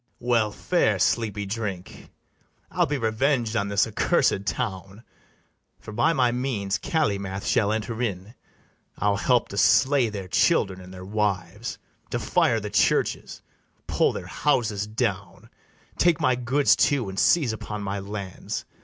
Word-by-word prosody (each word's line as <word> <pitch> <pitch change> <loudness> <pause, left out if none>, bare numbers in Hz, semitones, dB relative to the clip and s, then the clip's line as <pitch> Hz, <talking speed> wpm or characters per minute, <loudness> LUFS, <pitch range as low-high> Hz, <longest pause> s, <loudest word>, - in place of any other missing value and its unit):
well 115 -3 +1
fare, 110 - +1
sleepy 105 +1 0
drink! 100 -3 -6 0.6
I'll - - +1
be 145 - -1
reveng'd 115 0 0
on 100 -3 0
this 100 0 +2
accursed 100 -2 +1
town; 100 -2 -4 0.8
For - - -10
by 120 +10 +2
my 125 -7 +2
means 120 -6 -2
Calymath 100 - -1
shall 105 0 +2
enter 110 +2 -3
in: 100 -2 -3 0.6
I'll 100 0 +1
help 125 +3 +2
to 100 - -3
slay 130 -3 +4
their 100 -3 -6
children 95 - +2
and 90 0 -12
their 95 0 -9
wives, 105 0 -2 0.3
To - - -2
fire 115 -1 +2
the 105 -1 -6
churches, 100 -3 0 0.4
pull - - +2
their - - -6
houses 115 -8 0
down, 100 -5 -3 0.5
Take 175 -2 +3
my 130 - +3
goods 130 +4 +3
too, 140 -7 +1
and 95 0 -4
seize 145 -10 +3
upon 105 -1 -6
my 100 0 -3
lands. 100 -1 -6
105 Hz, 145 wpm, -25 LUFS, 100-120 Hz, 0.8 s, slay